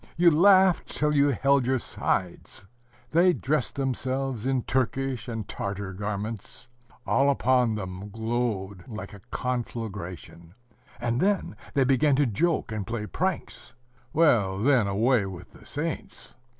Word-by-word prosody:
you 170 0 +6
laughed 190 +2 +5
till 150 0 +1
you 145 -1 +4
held 135 0 +2
your 130 0 +2
sides. 95 -5 -2 0.5
They 175 +3 +5
dressed 145 -5 -1
themselves 130 -2 -2
in 130 -2 +1
Turkish 130 0 -1
and 115 -4 -4
Tartar 100 -1 -4
garments. 105 +3 -5 0.4
All 140 +1 +3
upon 125 -4 +2
them 95 0 -6
glowed 110 -3 -3
like 110 -2 -7
a 100 - -10
conflagration,... 100 -8 -5 0.4
and 120 +1 -1
then 195 - +1 0.2
they 140 - +4
began 135 +2 +3
to 145 +1 +3
joke 135 - 0
and 105 -4 -4
play 115 -2 -3
pranks.... 180 - -3 0.4
Well, 115 -12 +3
then 130 -6 +4
away 110 +2 +2
with 90 -2 -9
the - - -16
saints! 155 +2 -4
125 Hz, 135 wpm, -27 LUFS, 105-140 Hz, 0.5 s, you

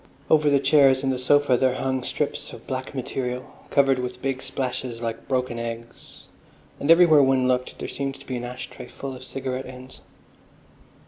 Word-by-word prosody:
Over 150 -1 +5
the 140 -1 +4
chairs 135 -1 +4
and 130 -2 0
sofa 140 0 +3
there 130 0 +2
hung 130 -1 -1
strips - - -3
of - - -11
black 130 +2 -5
material, 125 -1 -4 0.2
covered 135 -2 +3
with 125 0 -4
big 135 0 -2
splashes 130 -3 -4
like 115 -1 -5
broken 125 -2 -1
eggs, 115 0 -8 0.6
and 140 - -3
everywhere 165 -3 +7
one 130 -1 +3
looked 125 0 0
there - - -5
seemed 135 -1 -4
to - - -15
be 130 - -3
an 120 - -5
ash 125 +1 -6
tray - - -10
full 135 -1 -7
of 125 - -10
cigarette 130 0 -4
ends. 130 0 -11
130 Hz, 180 wpm, -24 LUFS, 125-135 Hz, 0.6 s, everywhere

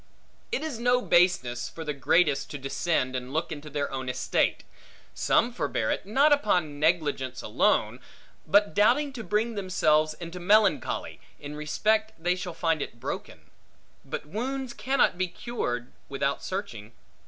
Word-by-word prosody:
It 460 - -1
is 295 -8 -4
no 245 +1 +3
baseness, 150 -9 +2
for 165 - -8
the 150 -2 -3
greatest 140 +1 +2
to 145 - -5
descend 135 -1 -1
and 125 0 -4
look 160 +4 -2
into 150 -1 -7
their 145 -1 -2
own 130 -1 -4
estate. 125 0 0 0.5
Some 240 +1 +2
forbear - - -1
it, - - -3
not 280 +8 +5
upon 180 - +1
negligence 150 -5 0
alone, - - +1 0.5
but 205 +1 +4
doubting 260 +8 +3
to 235 -4 -6
bring 215 +3 0
themselves 155 -6 +2
into 170 +2 -8
melancholy, 205 +2 +2 0.2
in 145 +1 -7
respect 215 +9 0
they 175 +2 +1
shall 180 -2 -6
find 165 -2 0
it 120 - -6
broken. - - -6 0.6
But - - -5
wounds 250 - -4
cannot 260 -9 +1
be 185 - +1
cured 150 - -4 0.2
without 140 0 -1
searching. 120 - -5
175 Hz, 150 wpm, -27 LUFS, 145-215 Hz, 0.6 s, not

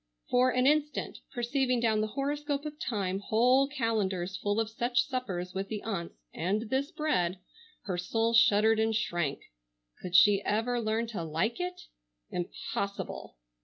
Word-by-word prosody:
For 250 +1 +5
an 250 0 +2
instant, 295 +1 +1
perceiving 250 +1 0
down 220 -2 +2
the 215 - 0
horoscope 290 +1 -1
of 300 0 -6
time 195 -5 -2
whole 250 +6 +3
calendars 205 -9 -1
full 205 +3 -1
of 225 - +1
such 240 +2 0
suppers 185 -9 -4
with 195 +1 -3
the 210 -1 -5
aunts, 195 -6 -4 0.2
and 210 +7 -1
this 270 +2 0
bread, 195 - 0 0.5
her 180 -3 -3
soul 225 +6 0
shuddered 220 -1 +5
and 220 0 +2
shrank. 175 -9 -1 0.6
Could 180 -1 -4
she 200 0 +7
ever 235 +3 0
learn 220 +1 0
to 200 -7 -4
like 165 - -1
it? 360 0 -4 0.5
Impossible! 180 - -4
225 Hz, 150 wpm, -30 LUFS, 195-255 Hz, 0.6 s, she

